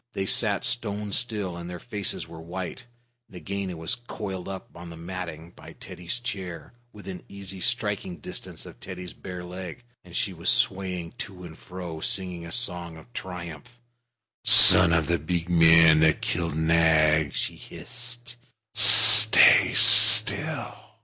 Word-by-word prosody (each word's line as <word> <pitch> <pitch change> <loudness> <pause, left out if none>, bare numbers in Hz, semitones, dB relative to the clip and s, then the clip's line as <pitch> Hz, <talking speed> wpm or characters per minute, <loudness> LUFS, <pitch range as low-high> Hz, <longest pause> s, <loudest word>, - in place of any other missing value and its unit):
They 95 - -6
sat 100 0 -2
stone 105 -3 -4
still, 105 -5 -6
and 85 0 -11
their 90 - -9
faces 105 -1 -7
were 80 -1 -14
white. 95 +8 -10 0.4
Nagaina 95 -2 -8
was 80 0 -6
coiled 105 -6 -9
up 95 -1 -10
on 85 0 -13
the 85 - -13
matting 85 -1 -10
by - - -17
Teddy's 90 +7 -9
chair, 95 -7 -9 0.2
within 95 -4 -12
easy 100 -1 -10
striking 100 -3 -5
distance 75 - -9
of - - -16
Teddy's 90 -1 -11
bare 90 -2 -11
leg, 90 +5 -11 0.2
and 90 -1 -16
she 100 - -3
was 85 +1 -5
swaying 90 -3 -3
to 95 -2 -11
and 80 -2 -13
fro, 90 -2 -11
singing 90 -1 -4
a - - -13
song 90 -7 -4
of 120 +9 -20
triumph. 90 +6 -11 0.6
"Son 90 -2 +7
of 80 -2 -1
the 85 +1 -3
big 85 +2 -6
man 80 -2 +3
that 80 -1 0
killed 85 -3 -5
Nag," 80 -2 0
she - - -5
hissed, 120 -1 -10 0.4
"stay - - +6
still. - - +6
90 Hz, 145 wpm, -22 LUFS, 85-100 Hz, 0.6 s, Son